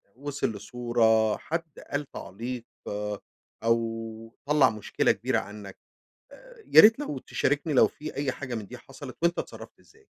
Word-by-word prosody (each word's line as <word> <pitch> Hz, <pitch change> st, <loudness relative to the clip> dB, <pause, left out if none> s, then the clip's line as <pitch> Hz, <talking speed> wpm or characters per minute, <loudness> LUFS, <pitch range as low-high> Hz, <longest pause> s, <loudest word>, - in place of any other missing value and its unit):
وصل 140 Hz, -1 st, -2 dB
لصورة، 110 Hz, 0 st, +2 dB
حد 165 Hz, -1 st, -5 dB
قال 145 Hz, -1 st, -2 dB
تعليق، 120 Hz, +4 st, -6 dB, 1.0 s
أو 115 Hz, -1 st, -1 dB
طَلّع 145 Hz, -2 st, +5 dB
مشكلة 110 Hz, -2 st, +1 dB
كبيرة -, -, 0 dB
عنك. 105 Hz, -1 st, -9 dB, 0.5 s
آآ -, -, -15 dB
يا -, -, +10 dB
ريت 225 Hz, +5 st, +7 dB
لو 220 Hz, -, -3 dB
تشاركني 145 Hz, +4 st, 0 dB
لو 130 Hz, -, +6 dB
في 155 Hz, 0 st, -8 dB
أي 140 Hz, -1 st, 0 dB
حاجة 130 Hz, -2 st, -5 dB
من 110 Hz, -3 st, -5 dB
دي -, -, -9 dB
حصلت -, -, -11 dB
وأنتَ 170 Hz, 0 st, +3 dB
اتصرفت -, -, -8 dB
إزاي؟ 435 Hz, -1 st, -23 dB
125 Hz, 145 wpm, -27 LUFS, 115-150 Hz, 1.0 s, يا